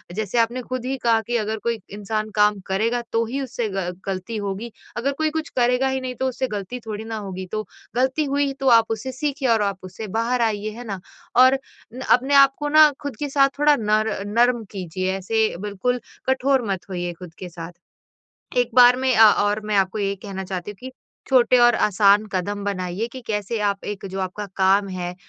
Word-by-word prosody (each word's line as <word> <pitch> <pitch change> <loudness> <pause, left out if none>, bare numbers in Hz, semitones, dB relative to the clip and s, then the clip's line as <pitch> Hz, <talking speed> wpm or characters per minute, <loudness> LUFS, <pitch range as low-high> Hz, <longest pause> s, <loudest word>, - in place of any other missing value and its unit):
जैसे 215 +2 -2
आपने 235 +2 +1
खुद 255 0 -5
ही 265 +1 -2
कहा 230 -1 +3
कि 240 - -1
अगर 220 0 -2
कोई 235 -1 -1
इंसान 215 +1 -3
काम 210 -1 +3
करेगा 225 +5 0
तो 230 0 +2
ही 265 +5 -3
उससे 245 -3 -3
ग 180 -2 -2 0.2
गलती 195 +4 -3
होगी, 205 +3 -4 0.3
अगर 260 +4 0
कोई 310 +2 0
कुछ 320 +1 -4
करेगा 250 +2 +3
ही 265 0 -1
नहीं 255 -1 -5
तो 260 - -1
उससे 260 +1 -2
गलती 210 +2 -5
थोड़ी 215 -1 -5
ना 225 0 -5
होगी, 190 -3 -6
तो 215 0 -3 0.3
गलती 260 +5 +1
हुई 280 0 0
तो 270 - -1
आप 230 -2 +6
उससे 225 +4 -3
सीखिए 275 0 -2
और 225 -2 +3
आप 200 -1 -1
उससे 185 +4 -7
बाहर 240 +2 +1
आइए, 215 -2 0
है 235 +3 -9
ना? 200 -5 -5 0.4
और 260 +2 +6 0.3
न 255 - -8
अपने 265 +3 +4
आप 275 -1 +7
को 295 0 -2
ना 310 0 +7
खुद 285 -4 -5
के 290 - -2
साथ 275 0 +4
थोड़ा 295 0 +5
नर 215 0 +1
नर्म 240 +2 +2
कीजिए 185 -1 -3
ऐसे 220 +3 0
बिल्कुल 210 +5 -2 0.3
कठोर 265 0 +2
मत 190 0 -5
होइए 175 -2 -3
खुद 180 -3 -10
के 180 - -7
साथ। 165 0 -8 0.9
एक 245 -1 +2
बार 250 0 +8
में 260 -1 +1
अ 220 -1 +8
और 205 +1 +1
मैं 210 -1 -1
आपको 195 +2 +1
ये 200 -1 -1
कहना 195 -2 -5
चाहती 185 +1 -5
हूँ - - -14
कि 260 +1 -8 0.4
छोटे 255 -1 +4
और 240 -1 +6
आसान 205 0 +4
कदम 200 +2 -2
बनाइए 190 +1 -2
कि 260 - -8
कैसे 210 +1 -2
आप 200 0 -4
एक 205 -1 -5
जो 190 - -4
आपका 190 +2 -4
काम 195 +1 +3
है, 180 -1 -4
220 Hz, 210 wpm, -22 LUFS, 200-255 Hz, 0.9 s, बार